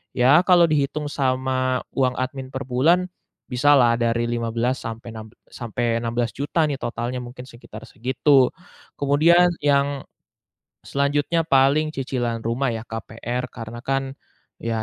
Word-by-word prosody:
ya 135 +7 +5
kalau 180 -2 +6
dihitung 150 0 0
sama 130 -1 0
uang 130 -2 +1
admin 130 +1 -4
per 130 - -3
bulan, 165 +9 +2 0.4
bisalah 125 -2 +4
dari 115 0 0
Rp15.000.000 120 +2 -1
sampai 115 +1 -7
enam 110 0 -8 0.2
sampai 120 0 -2
Rp16.000.000 120 +7 -1
nih 140 -2 -3
totalnya. 120 +2 -4
Mungkin 125 +1 -10
sekitar 120 -3 -12
segitu. 130 +3 +2 0.5
Kemudian 165 +5 +4
yang 140 -1 +1 0.8
selanjutnya, 145 +4 0
paling 140 +2 +3
cicilan 120 -3 -2
rumah 120 +3 0
ya, 110 - -5
KPR. 115 +2 -5
Karena 115 0 -8
kan, 135 0 -1 0.5
ya 115 -1 -2
130 Hz, 125 wpm, -22 LUFS, 120-140 Hz, 0.8 s, kalau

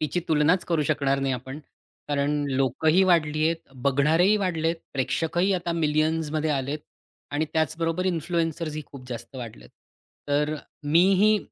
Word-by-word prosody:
तिची 155 +3 -1
तुलनाचं 160 +4 +3
करू 165 -3 +2
शकणार 140 -2 +1
नाही 135 -1 0
आपण, 130 +3 -7 0.5
कारण 145 0 0
लोकही 135 +7 +2
वाढली 155 -2 +2
आहेत, 165 0 +1 0.3
बघणारेही 155 +9 +3
वाढलेत. 170 -4 0 0.2
प्रेक्षकही 165 +7 0
आता 175 -2 -2
मिलियन्समध्ये 155 -1 0
आलेत 140 +1 -1 0.5
आणि 145 +2 0
त्याचबरोबर 165 +3 0
इन्फ्लुएन्सर्स 165 -2 -1
ही 155 - -4
खूप 130 -3 -12
जास्त 125 +2 -7
वाढलेत. 110 - -9 0.6
तर 150 +1 +1 0.3
मीही 190 +7 +4
155 Hz, 130 wpm, -25 LUFS, 140-170 Hz, 0.6 s, मीही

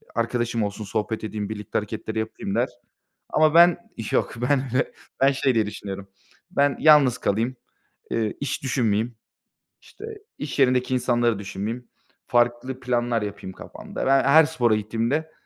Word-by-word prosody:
arkadaşım 115 -1 0
olsun, 100 +1 -4
sohbet 110 +2 -3
edeyim, 105 -1 -4
birlikte 105 -2 -4
hareketleri 110 +1 -5
yapayım 110 0 -4
der. - - +1 0.6
Ama 155 0 +3
ben, 175 +1 +7 0.3
yok, - - +1
ben 130 +3 +1
öyle, 130 - +1 0.3
ben 135 +1 +5
şey 135 -1 +1
diye 110 -2 +2
düşünüyorum. 100 -1 -7 0.4
Ben 140 -5 +2
yalnız 145 -5 +6
kalayım, 115 +5 0 0.6
ııı, 110 -2 0
iş 140 -1 -3
düşünmeyeyim, 120 -3 0 0.7
işte, 435 - -12 0.3
iş 145 -1 -5
yerindeki 125 -1 +3
insanları 120 -3 +1
düşünmeyeyim, 105 +5 -5 0.4
farklı 120 +2 +1
planlar 120 -2 0
yapayım 100 -2 -6
kafamda. - - -7
Ben 135 0 +4
her 155 +4 +7
spora 120 -8 +2
gittiğimde 115 +9 -1
120 Hz, 140 wpm, -24 LUFS, 110-135 Hz, 0.7 s, ben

